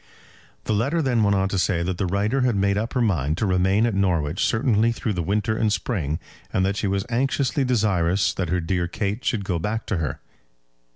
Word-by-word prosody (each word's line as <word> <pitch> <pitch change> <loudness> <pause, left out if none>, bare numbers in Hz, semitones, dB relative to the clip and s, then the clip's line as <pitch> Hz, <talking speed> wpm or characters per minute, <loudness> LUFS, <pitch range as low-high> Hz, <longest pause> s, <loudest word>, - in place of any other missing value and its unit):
The - - -1
letter 135 +11 +1
then 130 -7 +1
went 100 -1 +3
on 95 0 +1
to 100 - -1
say 85 -2 +1
that 90 0 -3
the 95 - 0
writer 105 +8 0
had 125 -3 +2
made 100 0 +2
up 110 +3 -2
her 125 - +1
mind 80 - 0
to 110 - 0
remain 95 +3 +2
at 115 - 0
Norwich 90 -5 0
certainly 115 0 +2
through 110 -2 -2
the 90 - -2
winter 105 +5 0
and 110 -1 +1
spring, 90 - -1 0.3
and 95 - +1
that 100 +1 0
she 105 - -1
was 95 0 -1
anxiously 135 +3 0
desirous 100 -6 +1
that 90 -4 -3
her 90 +1 +1
dear 85 +1 -1
Kate 100 +5 -3
should 105 -5 -1
go 90 -3 -1
back 110 +6 -3
to 100 - -1
her. 80 -5 -3
100 Hz, 220 wpm, -23 LUFS, 90-110 Hz, 0.3 s, went